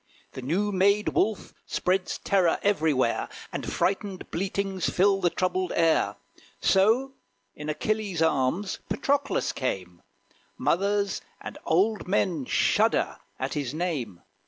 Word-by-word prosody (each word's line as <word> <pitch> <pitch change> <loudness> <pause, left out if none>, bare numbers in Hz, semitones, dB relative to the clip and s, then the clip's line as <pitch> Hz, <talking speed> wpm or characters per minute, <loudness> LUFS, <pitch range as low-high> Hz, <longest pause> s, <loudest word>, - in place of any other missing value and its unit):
The 130 - -7
new 185 +11 0
made 200 +2 +3
Wolf 215 0 0
spreads 185 0 0
terror 185 -4 +2
everywhere; 155 -11 +1 0.2
And - - -4
frightened 195 0 -1
bleatings 195 0 -1
fill 195 +1 +3
the 175 - +3
troubled 185 +1 -1
air. 160 -11 +3 0.4
So 225 +8 +3 0.4
in 150 +1 -7
Achilles 205 +2 -1
arms 160 +5 +1
Patroclus 280 0 0
came: 90 -9 -4 0.6
Mothers 200 +7 +1 0.2
and - - -8
old 200 +6 +2
men 180 -7 +1
shudder - - +2 0.2
at - - -3
his 145 -2 -3
name. 145 - -3
185 Hz, 115 wpm, -27 LUFS, 155-200 Hz, 0.6 s, made